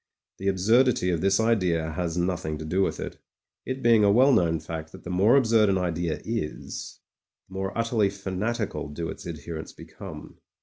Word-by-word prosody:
The 95 - -3
absurdity 105 +1 +3
of 85 -2 -1
this 95 +2 +3
idea 90 -8 +1
has 85 0 -3
nothing 85 -3 -1
to 80 - -7
do 90 +5 0
with - - 0
it, - - -6 0.5
it 130 0 -4
being 115 -2 +5
a 100 - +5
well 130 +6 +5
known 85 -6 +2
fact 80 0 -6
that - - -12
the 90 - -6
more 100 +7 +4
absurd 115 -5 +4
an 95 - +2
idea 85 -3 -1
is, 115 -9 -5 0.5
the 95 - -16
more 95 +2 -3
utterly 115 -3 +2
fanatical 95 - -3
do 80 +3 -4
its - - -8
adherents 80 -1 -7
become. - - -11
95 Hz, 180 wpm, -26 LUFS, 85-110 Hz, 0.5 s, being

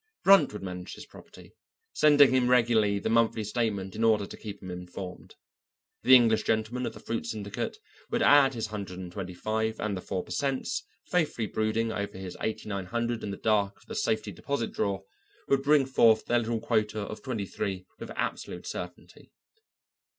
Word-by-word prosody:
Brunt 195 0 +7
would 105 - -7
manage 90 -1 -6
his - - -10
property, - - -15 0.4
sending 145 -2 +6
him 130 -1 +3
regularly 115 -4 +4
the 100 - -3
monthly 115 -1 +2
statement 105 -3 -2
in 110 - -2
order 110 -3 +4
to - - -9
keep 100 -2 -8
him 95 - -6
informed. 90 +1 -8 0.7
The 130 - +8
English 115 -3 +5
gentleman 110 +3 -1
of - - -5
the - - -10
fruit 115 - -4
syndicate 100 -2 -4 0.3
would - - +1
add 140 -2 +6
his 115 - -2
hundred 100 -4 -6
and 90 -1 -7
twenty 90 -1 -6
five, 110 +3 -2
and 105 -2 -1
the 95 - -5
4 95 0 -3
per - - -14
cents., 135 -3 -1 0.2
faithfully 155 -10 0
brooding 110 +2 0
over 100 -3 -4
his 95 -1 -7
eighty 110 - -3
nine 100 -3 -4
hundred 120 +3 -2
in 105 - -3
the 100 - -5
dark 105 -2 +1
of - - -23
the - - -8
safety 110 -2 -1
deposit 115 +6 -3
drawer, 100 -2 -1 0.4
would 135 -1 +3
bring 145 0 +4
forth 115 -4 +4
their 120 - +2
little 115 0 -1
quota 110 -2 0
of 105 +1 -6
twenty 115 -7 -3
three 95 -1 -4
with - - -7
absolute - - -4
certainty. 90 0 -8
110 Hz, 185 wpm, -28 LUFS, 100-120 Hz, 0.7 s, The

